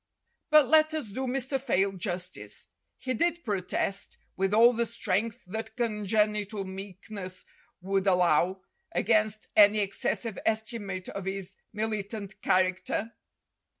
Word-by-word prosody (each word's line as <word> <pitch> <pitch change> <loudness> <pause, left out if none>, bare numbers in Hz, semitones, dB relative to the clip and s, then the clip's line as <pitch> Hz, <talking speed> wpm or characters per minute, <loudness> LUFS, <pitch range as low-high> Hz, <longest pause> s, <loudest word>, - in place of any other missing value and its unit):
But 305 -3 +7
let 310 +2 +4
us 295 -9 -3
do 260 +5 -3
Mr. 265 +1 -1
Fayle 195 -7 +2
justice. 185 -1 -4 0.3
He 255 - -2
did 340 +7 0
protest, 195 -2 -2 0.2
with 195 +1 0
all 230 +3 +6
the 235 0 0
strength 225 +1 -2
that 220 +4 -6
congenital 210 -2 0
meek 190 +2 -9
ness 185 -3 -5 0.4
would 195 +1 0
allow, 180 0 +3 0.3
against 215 0 +1
any 210 0 +7
excessive 205 +2 -1
estimate 215 -4 -2
of 195 -2 -6
his 195 0 -4 0.2
militant 210 -1 -4
character. 185 +4 +1
210 Hz, 120 wpm, -28 LUFS, 190-230 Hz, 0.4 s, But